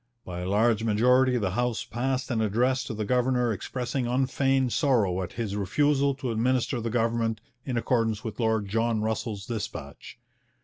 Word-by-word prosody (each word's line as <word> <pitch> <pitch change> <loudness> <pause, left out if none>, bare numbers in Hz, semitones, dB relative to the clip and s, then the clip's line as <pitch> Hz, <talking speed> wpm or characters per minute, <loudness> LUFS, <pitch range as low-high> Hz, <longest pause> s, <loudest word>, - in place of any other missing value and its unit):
By 90 -1 -6
a 90 +1 -3
large 110 +2 +2
majority 125 +4 +3
the 100 -5 -1
House 120 +3 -1
passed 130 +2 -2
an 115 -2 +1
address 125 +5 +1
to 110 - -5
the 105 0 -2
governor 125 0 +2
expressing 125 +4 -3
unfeigned 130 0 +1
sorrow 110 - +2
at 90 - -5
his 110 -4 -3
refusal 140 +7 +2
to 130 -2 -3
administer 125 +2 0
the 115 - -2
government 115 -1 0 0.3
in 125 -3 -2
accordance 115 -3 0
with 110 0 -6
Lord 110 -3 +1
John 115 +1 0
Russell's 110 -2 -3
dispatch. 115 -4 -6
115 Hz, 165 wpm, -27 LUFS, 110-125 Hz, 0.3 s, majority